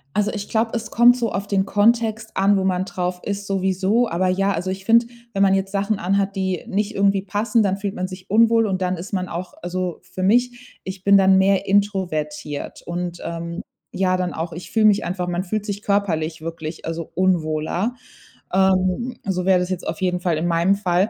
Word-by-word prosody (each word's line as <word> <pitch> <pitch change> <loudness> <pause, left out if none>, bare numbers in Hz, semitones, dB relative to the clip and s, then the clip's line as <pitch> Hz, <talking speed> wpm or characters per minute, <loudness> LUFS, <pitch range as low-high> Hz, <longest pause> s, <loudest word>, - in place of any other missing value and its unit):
Also, 210 0 +2
ich 205 -2 -5
glaube, 225 0 0
es 225 -1 -4
kommt 240 +1 +6
so 235 -2 -1
auf 195 +2 -3
den 195 -1 +1
Kontext 220 +1 +1
an, 200 +1 +4
wo 190 - +1
man 185 0 0
drauf 180 -1 -3
ist, 200 0 -4
sowieso, 195 +4 +1
aber, 180 +3 0
ja, 195 +2 +1
also, 180 +2 -3
ich 190 0 -5
finde, 230 +1 +5 0.3
wenn 195 - 0
man 195 -1 +5
jetzt 195 0 -1
Sachen 200 +1 0
anhat, 195 +2 0
die 190 -2 -2
nicht 210 +2 -1
irgendwie 195 0 +2
passen, 210 +4 +1
dann 195 -1 0
fühlt 200 -1 -4
man 185 0 -2
sich 185 0 -11
unwohl 225 +1 +4
und 190 -2 -1
dann 180 0 0
ist 180 +5 -8
man 185 -2 -1
auch 175 +1 -6
also, 180 0 -3
für 185 - -8
mich, 245 +5 0
ich 190 0 -7
bin 200 0 +6
dann 190 0 +5
mehr 195 0 +3
introvertiert 175 -8 -1
und, 175 0 -4
ähm, 170 +2 -5 0.3
ja, 185 -1 +1
dann 180 -1 -2
auch 165 +1 -4
ich 175 +2 -9
fühle 220 -1 +3
mich 205 -1 +4
einfach 180 0 -3
man 175 +1 -1
fühlt 210 +2 -3
sich 205 0 -4
körperlich 170 -7 -1
wirklich, 165 -1 -6
also, 165 0 -4
unwohler. 175 +4 0 0.6
Ähm, 190 +5 +2
so 185 -2 -1
wäre 190 -1 +5
das 180 +1 -2
jetzt 180 - -4
auf 160 - -3
jeden 180 -1 0
Fall 175 -3 0
in 165 - -1
meinem 170 +3 +3
Fall. 190 +1 +1
190 Hz, 210 wpm, -21 LUFS, 180-205 Hz, 0.6 s, kommt